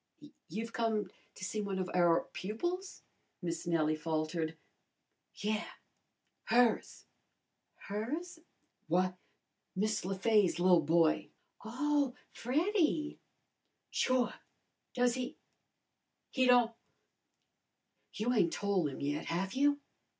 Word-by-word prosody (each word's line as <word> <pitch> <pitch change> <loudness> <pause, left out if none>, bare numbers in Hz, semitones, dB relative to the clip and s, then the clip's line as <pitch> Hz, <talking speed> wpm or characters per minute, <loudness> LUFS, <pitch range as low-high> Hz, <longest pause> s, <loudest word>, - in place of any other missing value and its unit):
"You've 225 +7 -4
come 225 -2 0 0.2
to 185 - -6
see 210 +4 -2
one 200 -2 -2
of 185 -1 -1
our 175 -2 +4
pupils?" 350 - -3 0.4
Miss 170 -1 -4
Nellie 155 -2 +2
faltered. 160 +1 -2 0.8
"Yeah. 215 +1 -1 0.8
Hers." 235 0 +2 0.7
"Hers?" 290 - -4 0.5
"W'y, 180 +2 +2 0.6
Miss 215 +3 0
Le 190 +1 -2
Fay's 205 -4 +3
li'l 180 -1 +6
boy." 160 +1 +3 0.3
"Oh, 275 +3 0 0.2
Freddy?" 310 - +1 0.7
"Sure! 255 -1 +2 0.6
Does 245 -1 +3
he 250 0 -4 0.9
he 260 -2 +2
don't 245 -2 +5 1.4
you 230 +4 0
ain't 175 -8 +3
tole 200 -5 +1
'im 135 - -6
yet, 145 +2 -1
have 190 +4 -2
you?" 285 +2 +3
210 Hz, 100 wpm, -33 LUFS, 175-250 Hz, 1.4 s, li'l